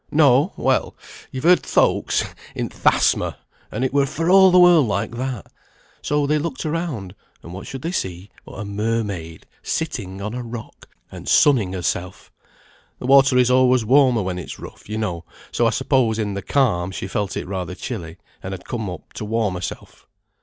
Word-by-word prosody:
No! 145 Hz, +3 st, +4 dB
Well! -, -, 0 dB, 0.3 s
you've 130 Hz, -, -6 dB
heard 180 Hz, +2 st, +5 dB
folks -, -, +1 dB, 0.3 s
in -, -, -3 dB
th' -, -, -4 dB
asthma, -, -, +2 dB, 0.3 s
and 120 Hz, +5 st, -1 dB
it 130 Hz, -, -2 dB
were 140 Hz, -1 st, +3 dB
for 165 Hz, +5 st, -1 dB
all 190 Hz, 0 st, +8 dB
the 180 Hz, -, +4 dB
world 175 Hz, -6 st, +6 dB
like 100 Hz, -1 st, -1 dB
that. 125 Hz, -2 st, -4 dB, 0.6 s
So 150 Hz, -1 st, 0 dB
they 150 Hz, +1 st, +1 dB
looked 150 Hz, -3 st, -4 dB
around, 150 Hz, -, -3 dB, 0.3 s
and 85 Hz, -, -10 dB
what 95 Hz, -, -8 dB
should 135 Hz, 0 st, -7 dB
they 165 Hz, -, -2 dB
see 95 Hz, -, -4 dB
but -, -, -13 dB
a 105 Hz, -, -6 dB
mermaid, 100 Hz, -5 st, -3 dB, 0.2 s
sitting 105 Hz, -, -3 dB
on 105 Hz, +3 st, -4 dB
a 125 Hz, -, -4 dB
rock, 115 Hz, -1 st, -9 dB, 0.2 s
and -, -, -7 dB
sunning 115 Hz, -11 st, +4 dB
herself. 90 Hz, 0 st, -4 dB, 0.7 s
The -, -, -8 dB
water 135 Hz, -1 st, +5 dB
is 125 Hz, 0 st, +4 dB
always 130 Hz, -2 st, +4 dB
warmer 130 Hz, -3 st, +4 dB
when 90 Hz, -1 st, -3 dB
it's 90 Hz, -, -8 dB
rough, -, -, -12 dB
you 110 Hz, -, -3 dB
know, 90 Hz, -6 st, -3 dB, 0.3 s
so -, -, +2 dB
I -, -, +4 dB
suppose 115 Hz, -5 st, +1 dB
in 105 Hz, -2 st, -2 dB
the 100 Hz, -, -4 dB
calm 105 Hz, -12 st, +1 dB
she 95 Hz, -, -5 dB
felt 100 Hz, 0 st, -2 dB
it -, -, -4 dB
rather 90 Hz, -3 st, -4 dB
chilly, 80 Hz, -1 st, -6 dB, 0.2 s
and 95 Hz, +1 st, -5 dB
had 90 Hz, -, -13 dB
come 110 Hz, -5 st, -4 dB
up 90 Hz, -2 st, -10 dB
to -, -, -6 dB
warm 110 Hz, -2 st, 0 dB
herself." 90 Hz, -1 st, -7 dB
115 Hz, 190 wpm, -21 LUFS, 95-140 Hz, 0.7 s, all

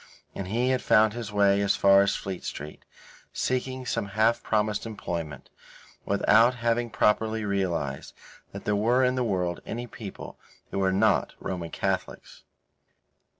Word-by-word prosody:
And 95 Hz, -, -5 dB
he 120 Hz, +6 st, 0 dB
had 130 Hz, -1 st, +1 dB
found 110 Hz, 0 st, +4 dB
his 115 Hz, -3 st, -6 dB
way 100 Hz, -1 st, +3 dB
as 100 Hz, 0 st, +2 dB
far 100 Hz, 0 st, +6 dB
as 100 Hz, -, +1 dB
Fleet 95 Hz, -2 st, -5 dB
Street, 75 Hz, +1 st, -7 dB, 0.5 s
seeking 130 Hz, 0 st, -2 dB
some 115 Hz, -4 st, -2 dB
half 115 Hz, +2 st, +3 dB
promised 105 Hz, 0 st, 0 dB
employment, 85 Hz, -8 st, -6 dB, 0.5 s
without 110 Hz, +5 st, +4 dB
having 120 Hz, 0 st, 0 dB
properly 110 Hz, 0 st, +1 dB
realized 85 Hz, -9 st, -2 dB, 0.4 s
that -, -, -9 dB
there 105 Hz, -, +1 dB
were 120 Hz, +5 st, +2 dB
in 125 Hz, 0 st, +3 dB
the 130 Hz, -1 st, 0 dB
world 90 Hz, -6 st, -1 dB
any 120 Hz, +2 st, -5 dB
people 110 Hz, -4 st, -9 dB, 0.3 s
who -, -, -2 dB
were 95 Hz, -1 st, +2 dB
not 95 Hz, -, +2 dB
Roman 90 Hz, -3 st, -4 dB
Catholics. -, -, -4 dB
105 Hz, 150 wpm, -27 LUFS, 95-115 Hz, 0.5 s, far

